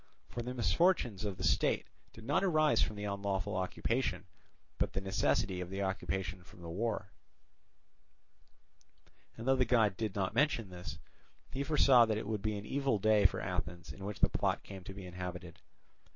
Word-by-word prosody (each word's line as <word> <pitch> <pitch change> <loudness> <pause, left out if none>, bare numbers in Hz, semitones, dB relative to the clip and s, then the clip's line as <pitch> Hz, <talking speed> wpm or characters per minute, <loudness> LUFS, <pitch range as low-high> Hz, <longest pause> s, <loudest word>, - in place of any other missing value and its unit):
For 120 - -4
the 125 +2 -5
misfortunes 120 - +2
of 100 -3 -3
the - - -5
state - - +2 0.3
did 110 - -13
not 140 - +1
arise 155 -5 +3
from 110 - 0
the 105 - -6
unlawful 100 -2 -2
occupation, 95 +1 -1 0.5
but - - 0
the - - 0
necessity 95 -1 0
of 90 - -5
the 95 +1 -2
occupation 95 -1 -2
from 90 -1 -15
the 85 - -6
war; 110 +5 -2 2.3
and 115 - -6
though 135 - +5
the 130 - +3
god 110 -5 +3
did 110 -4 -2
not 95 -2 0
mention 120 -10 +1
this, 90 -2 -7 0.5
he 135 - -3
foresaw 140 -5 +6
that 110 -1 0
it 110 - -3
would 105 -1 -2
be 105 0 -1
an 100 - -7
evil 135 -1 +1
day 105 0 +5
for - - -5
Athens 85 0 -4
in 100 - -11
which 100 0 -5
the - - +5
plot - - 0
came 95 -2 -9
to 95 - -7
be 95 -2 -8
inhabited. 90 -1 -7
100 Hz, 180 wpm, -34 LUFS, 95-120 Hz, 2.3 s, foresaw